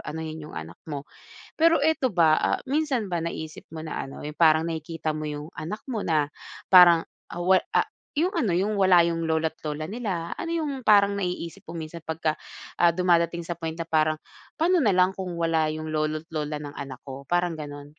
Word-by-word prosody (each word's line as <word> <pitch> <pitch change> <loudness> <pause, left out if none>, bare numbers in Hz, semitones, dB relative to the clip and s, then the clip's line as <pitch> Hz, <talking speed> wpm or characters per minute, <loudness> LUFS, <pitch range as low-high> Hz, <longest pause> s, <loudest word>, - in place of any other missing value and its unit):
anohin 160 0 -5
yung 150 - -10
anak 80 +2 -7
mo. 145 -2 -6 0.5
Pero 330 +1 +4
ito 300 -4 +2
ba, 165 -5 +4
ah, - - +1
minsan 275 -4 0
ba 170 -2 -1
naisip 160 -2 -6
mo 160 0 -7
na 155 - -3
ano, 135 - -9
yung 150 +1 -7
parang 160 -1 +5
nakikita 160 -1 -3
mo 155 0 -4
yung 150 0 -6
anak 160 +8 -5
mo 235 -6 -3
na 150 -3 +1 0.4
parang, 175 -2 +8 0.2
ah 175 - -5
wa 185 +1 +5 0.2
ah, - - +4 0.3
yung 360 +5 +2
ano 225 - +1
yung 190 +5 +1
wala 180 -3 +6
yung 165 -1 -1
lola't 160 0 0
lola 155 0 -4
nila. 190 -4 -3
Ano 335 - -5
yung 300 -5 -2
parang 205 -3 +5
naiisip 180 -4 -4
mo 170 - -6
minsan 160 +1 -7
pagka, 160 -1 -1 0.5
ah, 175 - +7
dumadating 170 -1 +1
sa 175 - -3
point 165 -1 -5
na 165 - -3
parang, 155 -1 +2 0.4
"Pa’no 345 +1 +3
nalang 185 -4 +3
kung 180 -3 -5
wala 165 -2 +1
yung 155 0 -4
lolo't 155 +1 -1
lola 150 -1 -2
ng 145 -1 -8
anak 135 -2 -7
ko?" 135 0 -9
Parang 175 -1 +1
ganun. 145 -2 -7
165 Hz, 195 wpm, -26 LUFS, 155-185 Hz, 0.5 s, parang